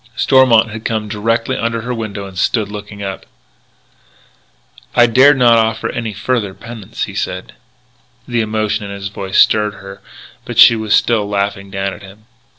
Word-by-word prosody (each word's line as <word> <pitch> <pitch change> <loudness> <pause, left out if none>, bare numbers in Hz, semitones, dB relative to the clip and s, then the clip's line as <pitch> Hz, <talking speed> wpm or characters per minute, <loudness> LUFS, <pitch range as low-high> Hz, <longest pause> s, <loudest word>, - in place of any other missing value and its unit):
Stormont 120 -5 +4
had 110 +1 -7
come 110 -2 -2
directly 115 +4 -1
under 115 0 -2
her 125 +2 -4
window 110 -4 -5
and 95 -1 -11
stood 105 +2 0
looking 105 -1 -8
up. 95 -1 -5 1.7
"I 120 - +6
dared 130 +5 +5
not 120 -2 +5
offer 110 0 -1 0.2
further 105 -2 -2
penance," 115 -4 -7
he - - -5
said. - - -4 0.7
The 120 -2 0
emotion 110 -1 -2
in 100 - -7
his 100 -1 -6
voice 95 -1 -4
stirred 105 -1 +3
her 95 0 -11 0.4
but - - -7
she 115 - +8
was 110 -1 +1
still 110 -4 +1
laughing 100 -1 -2
down 95 0 -3
at - - -12
him. 100 +2 -15
110 Hz, 160 wpm, -16 LUFS, 100-115 Hz, 1.7 s, she